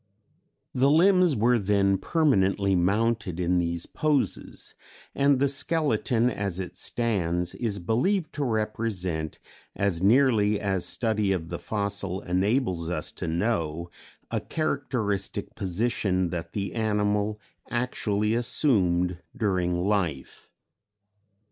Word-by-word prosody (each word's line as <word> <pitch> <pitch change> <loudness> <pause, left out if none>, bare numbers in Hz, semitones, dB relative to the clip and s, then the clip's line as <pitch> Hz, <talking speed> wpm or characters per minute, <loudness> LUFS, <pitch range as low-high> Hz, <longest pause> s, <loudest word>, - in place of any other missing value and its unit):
The 130 +2 +3
limbs 180 0 +4
were 120 +2 +3
then 100 -1 +2
permanently 100 - +2
mounted 100 +1 0
in 90 0 +2
these 85 -1 -2
poses, 150 -3 -1 0.4
and 140 0 +3
the 140 +2 +2
skeleton 135 -5 +1
as 100 -5 -3
it 90 - -6
stands 90 -7 -1
is 110 -4 -2
believed 150 - 0
to 145 - -2
represent, 105 - -2 0.4
as 100 -4 0
nearly 105 -2 +4
as 95 -3 -1
study 110 -3 0
of 85 -4 -2
the 85 - -4
fossil 100 -3 -2
enables 95 -2 0
us 90 - -2
to - - -6
know, 85 -2 -1 0.4
a - - 0
characteristic 130 - -2
position 95 -2 -1
that 85 -2 -5
the 100 -1 -3
animal 105 -1 0 0.3
actually 110 -3 0
assumed 90 - +2 0.2
during 90 -5 0
life.... 90 -9 -2
105 Hz, 110 wpm, -26 LUFS, 90-120 Hz, 0.4 s, limbs